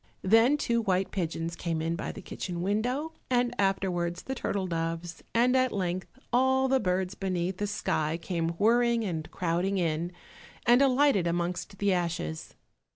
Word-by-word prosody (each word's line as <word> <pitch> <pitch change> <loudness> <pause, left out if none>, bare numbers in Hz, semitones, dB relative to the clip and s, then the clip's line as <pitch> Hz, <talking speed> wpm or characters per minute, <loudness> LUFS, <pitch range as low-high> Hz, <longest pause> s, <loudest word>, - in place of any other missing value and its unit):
Then 225 +8 +5
two 235 -5 +1
white 190 -3 0
pigeons 165 -2 -2
came 165 -2 -2
in 165 +1 -1
by 175 - -4
the - - -10
kitchen 175 -2 -5
window, 245 - 0 0.2
and 245 -1 +2
afterwards 180 -3 0
the 265 - -3
turtle 200 -6 -2
doves, 165 0 -3
and 245 +2 +3
at 255 -1 +3
length 185 -1 -2 0.3
all 260 +1 +3
the 265 0 +3
birds 185 -2 0
beneath 185 -1 -2
the 205 - -1
sky, 160 -6 -1
came 170 -1 -2
whirring 235 +2 +3
and 160 -5 -3
crowding 180 +3 0
in, 170 0 0 0.5
and 245 +2 +6
alighted 270 -8 +4
amongst 175 +3 -2
the 200 -1 +2
ashes. 170 - -3
190 Hz, 155 wpm, -29 LUFS, 170-235 Hz, 0.5 s, and